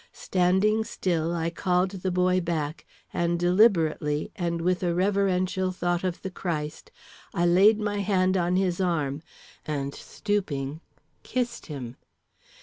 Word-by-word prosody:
Standing 190 +4 +2
still, 170 -6 -1
I 165 -1 -1
called 180 +2 +1
the 190 -1 -3
boy 180 0 +2
back, 155 -3 -3 0.3
and 170 0 0
deliberately, 170 -6 +2
and 170 -2 -2
with 180 +2 0
a 175 -2 0
reverential 185 -1 +1
thought 175 -1 -1
of 180 -2 -3
the 190 - -4
Christ, 155 -5 -4 0.5
I 175 - +2
laid 195 +5 +5
my 205 -1 -1
hand 190 -2 +2
on 180 -1 +1
his 185 -1 +1
arm, 155 -5 0 0.4
and, 140 -2 -3
stooping, 160 -8 -3 0.4
kissed 240 -2 -3
him. 130 -6 -7
180 Hz, 135 wpm, -26 LUFS, 165-190 Hz, 0.5 s, laid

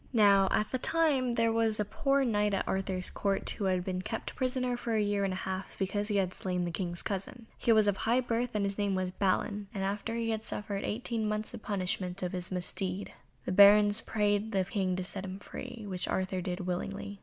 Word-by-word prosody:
Now 200 -4 +6
at 210 - +2
that 255 - -2
time 280 -7 +2
there 230 0 +3
was 225 -1 +2
a 210 - +1
poor 275 +6 +1
Knight 210 -3 +2
at - - -2
Arthur's 190 -1 -1
Court 200 -1 -1
who 200 - -3
had 185 -1 +1
been 185 0 -2
kept 225 +4 -5
prisoner 255 -1 0
for 235 -1 -2
a - - +3
year 205 -1 +1
and 195 - 0
a - - -2
half 190 0 -5
because 205 +2 -1
he 210 - 0
had 185 -2 +1
slain 180 -1 -2
the 170 - -2
King's 175 0 -3
cousin. 205 +4 -4
He 235 - +1
was 215 -2 +5
of 200 -1 +2
high 235 +3 +2
birth 245 0 -1
and 205 -1 +1
his 200 +1 -3
name 200 -1 +1
was 185 -1 -1
Balin, 200 +2 0
and 195 - -2
after 205 +3 -2
he 230 -1 -1
had 220 0 -2
suffered 205 -2 -3
eighteen 225 -1 -2
months 215 0 -1
the 240 - -7
punishment 185 -2 -2
of 180 - -1
his 180 -1 -4
misdeed 185 +1 -2 0.3
the - - -2
Barons 205 +2 +7
prayed 210 0 0
the 190 -1 +2
King 190 -1 -1
to 185 - -2
set 190 +1 -4
him 190 0 -5
free, 215 +2 -8
which 185 -2 -3
Arthur 185 0 -1
did 180 +1 -3
willingly. 195 +2 -4
200 Hz, 225 wpm, -31 LUFS, 190-220 Hz, 0.3 s, Barons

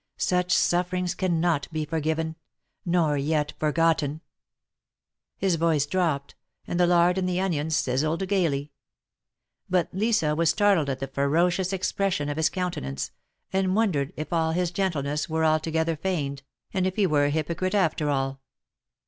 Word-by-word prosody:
Such 180 0 0
sufferings 180 0 +1
cannot 175 -5 0
be 155 -1 -2
forgiven, 160 +1 -2 0.3
— - - -52
nor 165 -4 +2
yet 150 +1 0
forgotten 155 -1 +1 0.6
!" - - -64
His 185 -4 +1
voice 160 -3 +2
dropped, 155 -4 -1 0.3
and 175 - -3
the 175 - +5
lard 175 +1 +4
and 185 -1 0
the 180 0 0
onions 160 -5 0
sizzled 155 +9 0
gayly. 155 -7 0 1.0
But 180 -2 +1
Lisa 195 -6 +1
was 165 0 +2
startled 190 -5 +3
at 135 - -1
the 135 - -2
ferocious 170 +7 +1
expression 190 -5 -1
of 145 - -3
his 160 - +3
countenance, 170 - -3 0.4
and 190 0 +1
wondered 175 -11 +1
if 155 +3 -5
all 160 -1 +1
his 175 0 0
gentleness 150 -6 -1
were 160 0 +1
altogether 160 +1 +1
feigned, 150 -5 -2 0.3
and 185 -1 +1
if 185 - -3
he 210 - +3
were 150 -4 +3
a - - +2
hypocrite 170 +6 -1
after 160 -6 +1
all. 135 -1 -1
165 Hz, 155 wpm, -26 LUFS, 150-180 Hz, 1.0 s, the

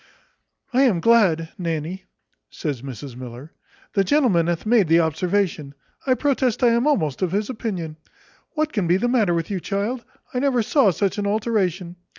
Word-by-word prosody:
"I 255 - +4
am 235 -11 +3
glad, 175 -7 +3
Nanny," 170 +2 -3 0.4
says 145 -7 -4
Mrs 130 -1 -8
Miller, 125 +4 -9 0.4
"the 195 - +3
gentleman 195 - +2
hath 170 +1 -2
made 215 -4 +4
the 165 +2 +5
observation; 160 -2 -1 0.3
I 255 - +4
protest 260 -4 0
I 240 - +6
am 235 +4 +2
almost 155 - 0
of 185 -1 0
his 205 +4 -1
opinion. 185 -10 -4 0.6
What 310 0 -1
can 200 -6 0
be 175 +2 +4
the 240 - 0
matter 220 -8 +2
with 165 +3 -3
you, 195 - -1
child? 210 +7 -3 0.3
I 250 - 0
never 255 -3 +2
saw 265 -1 +3
such 195 +3 -1
an 205 - -1
alteration. 195 -5 -1
195 Hz, 170 wpm, -22 LUFS, 165-235 Hz, 0.6 s, I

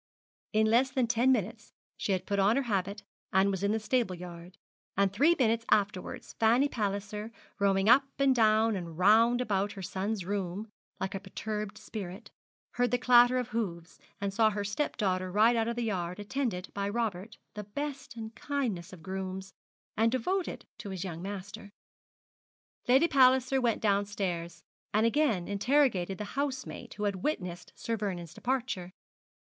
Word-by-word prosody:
In 220 0 +3
less 235 +4 +4
than 260 -2 +1
ten 235 +3 +3
minutes 225 -2 -2 0.2
she - - -2
had 185 -1 0
put 200 0 -1
on 200 +4 +4
her 275 - +1
habit, 200 -3 -2 0.3
and 190 +1 +4
was 190 -1 -3
in 200 0 +1
the 220 - +1
stable 220 -3 0
yard; 175 +1 -10 0.4
and 195 -1 +2
three 305 - +4
minutes 230 -3 +2
afterwards 200 -3 0
Fanny 235 +5 +4
Palliser, 210 -2 -3 0.3
roaming 195 0 +2
up 260 +4 +7
and 275 -1 +4
down 220 -1 +4
and 170 -4 -6
round 225 +6 +5
about 205 -3 0
her 195 - -8
son's 195 +1 -3
room 195 +1 -3 0.3
like 190 - -3
a 195 - -3
perturbed 210 +2 -5
spirit, 200 0 -7 0.4
heard 245 0 +1
the 245 - +2
clatter 245 0 +6
of 250 -1 -2
hoofs, 180 -8 -4 0.2
and 200 -1 -2
saw 220 +1 +4
her 205 -1 -3
stepdaughter 200 -5 -1
ride 220 +5 +5
out 225 -1 +1
of 235 - -1
the 240 - -2
yard 180 -4 -2
attended 205 -4 -3
by 200 0 -2
Robert, 215 -1 -3 0.2
the 210 -1 -6
best 275 +4 -5
and 220 -1 -7
kindest 225 -13 -3
of 170 -3 -12
grooms, 190 +1 -5 0.4
and 225 +1 +3
devoted 360 +10 -2
to 205 - -7
his 190 -2 -4
young 170 -3 -5
master. 200 +2 -7 1.2
Lady 265 +7 +5
Palliser 260 -1 +4
went 235 -3 0
downstairs, 195 -5 -1 0.3
and 215 +1 +4
again 230 - +2
interrogated 200 -3 +2
the 210 - -4
housemaid 265 -3 -3
who 210 - -5
had 200 -2 0
witnessed 180 - -3
Sir 230 - -2
Vernou's 180 -6 -4
departure. 245 -8 -2
210 Hz, 165 wpm, -30 LUFS, 190-240 Hz, 1.2 s, up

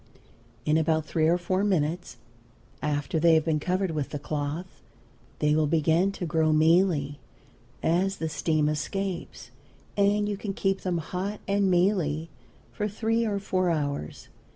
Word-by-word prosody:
In 155 +1 +3
about 160 -1 +1
three 155 0 +1
or 170 +2 +4
four 185 +2 -1
minutes 175 -6 -1 0.6
after 145 +1 -1
they 165 0 +5
have 160 0 +2
been 160 -2 +1
covered 185 +3 0
with 150 -3 -2
the 145 - -4
cloth 150 +4 -4 0.6
they 150 0 +2
will 155 0 +2
begin 165 +5 +2
to 185 - -4
grow 160 -1 +2
mealy, 155 -2 +3 0.6
as 185 +4 +2
the 160 - -2
steam 155 -1 0
escapes; 155 - -3 0.4
and 205 +1 +2
you 205 -1 -2
can 200 -1 -4
keep 195 -1 0
them 180 -2 -1
hot 185 +5 -4
and 200 -1 +2
mealy 175 -4 +1 0.4
for 210 - -2
three 225 +2 0
or 205 -1 -1
four 185 -2 0
hours. 145 - -3
170 Hz, 155 wpm, -27 LUFS, 155-195 Hz, 0.6 s, they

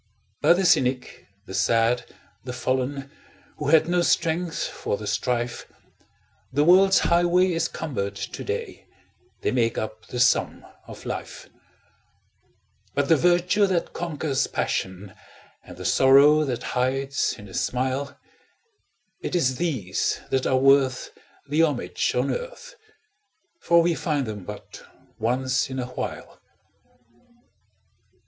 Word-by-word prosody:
By - - +6
the 190 +2 0
cynic, 130 -5 +1 0.2
the 95 - -9
sad, 115 +5 +1 0.3
the 125 - -6
fallen, 130 +2 -2 0.5
Who 150 - -4
had 160 +1 +5
no 175 0 +2
strength 170 0 0
for 100 - -4
the 105 - -8
strife, 120 +3 -2 0.8
The 145 +3 +2
world's 190 +4 +6
highway 175 +2 +3
is 165 - 0
cumbered 100 -11 -4
to - - -6
day 460 +2 -5 0.5
They - - 0
make 115 -2 0
up 110 0 -5
the 125 - -5
sum 125 +1 +2 0.2
of - - -11
life; - - -6 1.5
But 140 0 0
the 165 - +7
virtue 180 +5 +3
that 180 -3 -1
conquers 155 -5 -2
passion, 95 +1 -3 0.5
And - - -12
the - - -8
sorrow 145 +3 +5
that 125 -4 -3
hides 135 +2 0
in 105 - -12
a 95 - -13
smile 130 +6 -2 1.0
It - - -4
is 130 -7 +1
these 125 - -1
that 130 -1 +1
are 130 - +2
worth 135 -1 +3 0.4
the 150 +3 +2
homage 155 -4 0
on - - +1
earth, - - -6 0.9
For 170 - +4
we 170 0 +2
find 150 -4 -1
them 105 -4 -7
but - - -9 0.4
once 125 +3 0
in 130 - -5
a 125 - -2
while. 125 - -7
135 Hz, 130 wpm, -24 LUFS, 125-170 Hz, 1.5 s, the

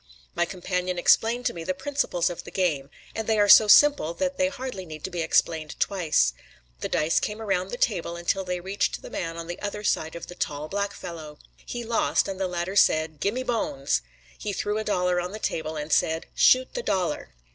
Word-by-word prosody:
My 175 - +1
companion 180 0 -3
explained 230 +7 +3
to - - +1
me 170 - -6
the 185 +2 -2
principles 190 -7 -1
of 175 - -7
the - - -9
game; 150 -8 -1 0.2
and 220 -1 -4
they 220 -1 +2
are 205 -1 +4
so 215 +1 +9
simple 245 - +6
that 275 +5 -1
they 275 0 +2
hardly 260 -8 -5
need 155 -3 -10
to 190 - -4
be 175 -1 -2
explained 160 -1 0
twice. 160 - +2 0.5
The - - -3
dice 155 +2 +2
came 210 +1 -3
around 195 -4 -1
the 245 - -5
table 175 -8 0
until 175 +3 -1
they 180 -1 -3
reached 190 +3 -2
the - - -9
man 165 -1 -4
on 165 - -5
the 175 +2 -7
other 210 0 -4
side 160 -5 0
of 170 - -6
the - - -10
tall, 150 -3 -3
black 200 0 -2
fellow. 160 -4 -8 0.3
He 240 -1 -4
lost, 230 0 +1
and 195 -1 -5
the 190 - 0
latter 175 +2 -3
said: 155 -5 +3
"Gimme 225 - -1
the 245 - -1
bones." 135 - -1 0.4
He 205 - -3
threw 210 +2 -1
a - - -2
dollar 180 -3 +1
on 180 +2 -5
the - - -4
table 160 -6 -3
and 150 0 -3
said: 160 0 +1
"Shoot 255 0 +4
the - - -2
dollar." 180 - -2
180 Hz, 220 wpm, -26 LUFS, 165-210 Hz, 0.5 s, so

